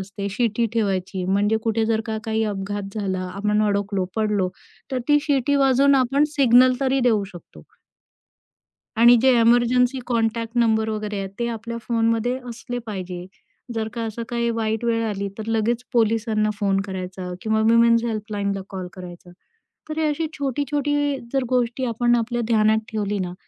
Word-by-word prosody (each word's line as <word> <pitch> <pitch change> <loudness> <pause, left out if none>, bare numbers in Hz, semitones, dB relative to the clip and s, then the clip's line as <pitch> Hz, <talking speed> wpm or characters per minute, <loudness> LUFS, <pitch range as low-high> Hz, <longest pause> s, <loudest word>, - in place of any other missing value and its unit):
असते, 200 +1 -5
शिटी 230 +2 0
ठेवायची. 190 -4 -1
म्हणजे 200 +3 +2
कुठे 225 0 +1
जर 220 -1 +1
का 220 -1 -2
काही 220 0 0
अपघात 200 -1 -4
झाला, 185 -2 -2
आपण 210 +1 +1
अडकलो, 200 -1 -1
पडलो 210 -4 +1 0.4
तर 260 - 0
ती 295 0 +6
शिट्टी 285 -1 +1
वाजवून 275 0 +4
आपण 270 +2 +3
सिग्नल 255 -1 +6
तरी 270 0 +1
देऊ 215 -3 +2
शकतो. 160 - -13 1.3
आणि 235 +2 +7
जे 260 +1 +5
इमर्जन्सी 245 +2 +3
कॉन्टॅक्ट 230 0 -1
नंबर 220 -2 +2
वगैरे 210 -1 -3
आहेत 195 -1 -4
ते 235 - 0
आपल्या 235 0 -5
फोनमध्ये 230 +1 0
असले 245 +1 -5
पाहिजे. 185 -4 -6 0.5
जर 220 -1 -2
का 235 - -4
असं 225 +1 -5
काही 235 -1 0
वाईट 225 0 -1
वेळ 230 -1 +1
आली, 200 -2 -2
तर 220 0 -6
लगेच 225 +2 0
पोलिसांना 220 -2 +1
फोन 195 -2 +1
करायचा 185 -1 -6
किंवा 220 0 +1
वुमन्स 230 +1 +4
हेल्पलाईनला 205 -3 -3
कॉल 185 -2 -5
करायचा. 180 -1 -11 0.6
तर 310 - -4
ही - - +1
अशी 305 +2 -1
छोटी-छोटी 285 +1 -1 0.4
जर 270 -1 +1
गोष्टी 250 0 0
आपण 240 0 +2
आपल्या 240 +1 -1
ध्यानात 220 -1 +3
ठेवली 210 -2 -2
ना, 180 -1 -3
225 Hz, 160 wpm, -22 LUFS, 205-240 Hz, 1.3 s, आणि